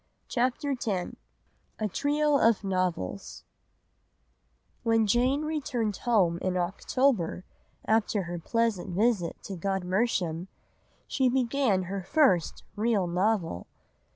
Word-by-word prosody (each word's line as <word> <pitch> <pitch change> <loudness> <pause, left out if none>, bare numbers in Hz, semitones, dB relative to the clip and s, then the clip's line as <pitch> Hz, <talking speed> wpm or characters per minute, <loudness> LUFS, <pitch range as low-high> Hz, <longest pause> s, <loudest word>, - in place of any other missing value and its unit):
CHAPTER 255 +3 0
X 255 -3 -4 0.9
A 215 - -1
TRIO 290 +6 +1
OF 225 -4 +3
NOVELS 185 - -2 1.4
When 225 -1 +3
Jane 250 +7 +2
returned 260 -10 -2
home 185 -8 +2
in 185 0 -1
October, 185 +1 0 0.4
after 220 -2 +1
her 175 0 -5
pleasant 205 -2 -1
visit 205 -4 +1
to 195 - -6
Godmersham, 185 -1 -1 0.6
she 260 -2 +2
began 250 -5 +1
her 195 +2 -4
first 190 - +2
real 215 -3 +1
novel. 180 - 0
210 Hz, 100 wpm, -28 LUFS, 180-245 Hz, 1.4 s, OF